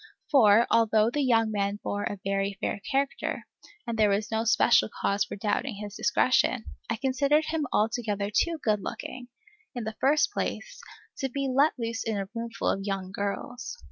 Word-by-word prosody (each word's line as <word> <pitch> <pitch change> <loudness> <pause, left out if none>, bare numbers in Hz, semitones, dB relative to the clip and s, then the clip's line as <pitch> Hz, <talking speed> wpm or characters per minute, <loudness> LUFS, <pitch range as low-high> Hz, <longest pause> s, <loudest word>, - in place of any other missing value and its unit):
For, 230 -5 +6
although 225 -1 +4
the 295 - 0
young 225 -4 +3
man 200 0 -1
bore 205 0 -2
a 205 - -3
very 195 0 -1
fair 205 - -2
character, 275 +1 -1 0.4
and 230 -1 -4
there 210 -1 +5
was 205 +3 0
no 220 0 0
special 225 - +4
cause 200 0 +1
for - - -7
doubting 210 +4 -1
his 205 0 -7
discretion, 255 -2 +2 0.2
I 225 - 0
considered 280 +5 +2
him 310 -3 -1
altogether 210 -2 0
too 335 +9 +1
good 210 -2 +1
looking, 250 +5 -6 0.5
in 240 - -3
the 220 0 -5
first 300 +7 +3
place, - - -4 0.4
to 270 - -1
be 275 +2 -2
let 275 +4 +3
loose 230 -1 -3
in 220 -2 -2
a 195 -1 -3
roomful 230 -1 -4
of 195 - 0
young 195 -2 -3
girls. 220 - -4
225 Hz, 175 wpm, -27 LUFS, 205-260 Hz, 0.5 s, For